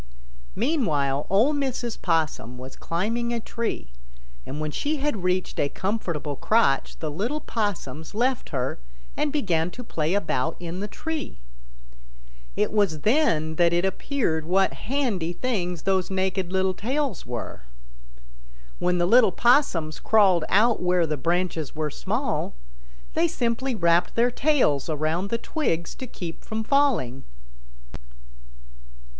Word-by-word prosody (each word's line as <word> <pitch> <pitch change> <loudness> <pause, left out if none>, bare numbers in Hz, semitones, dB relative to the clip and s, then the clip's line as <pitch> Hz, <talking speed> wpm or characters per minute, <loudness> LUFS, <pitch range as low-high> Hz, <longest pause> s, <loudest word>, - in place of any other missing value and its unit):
Meanwhile 155 - +1
Ol' 225 +10 +4
Mrs. 260 -5 -2
Possum 155 -8 0
was 130 +1 -9
climbing 230 +8 -1
a 235 - -1
tree, 225 - -4 0.6
and 145 - -5
when 155 0 -2
she 300 - -1
had 275 -9 -1
reached 180 0 0
a 140 - +2
comfortable 170 -8 -2
crotch 175 -5 +2
the 155 -2 -4
little 225 - -2
Possums 190 - -3
left 250 +2 0
her 130 - -2 0.4
and 300 -1 0
began 180 - +1
to 250 +7 -9
play 165 -5 -1
about 160 -6 0
in 175 +1 -5
the 205 - -3
tree. 320 +7 -5 1.2
It - - +1
was 195 -8 +1
then 165 - +2
that 170 -1 +4
it 175 +2 +2
appeared 190 - -1
what 190 +4 +2
handy 220 -10 -1
things 180 -7 -2
those 190 -2 +1
naked 190 -1 -1
little 190 0 +2
tails 260 - -2
were. 120 -2 -5 1.2
When 180 0 +2
the 175 - +2
little 230 +1 +6
Possums 180 - +2
crawled 190 -7 +4
out 225 +4 +4
where 180 -1 +3
the 155 -1 -1
branches 165 0 -1
were 155 -1 -2
small, 65 - -2 0.6
they 170 - +3
simply 240 +5 -1
wrapped 170 -2 +2
their 240 +1 +3
tails 250 - +2
around 160 +5 -1
the 230 - 0
twigs 200 - -2
to 260 - -7
keep 175 -7 -7
from 220 0 -3
falling. 230 - +2
185 Hz, 135 wpm, -25 LUFS, 160-235 Hz, 1.2 s, little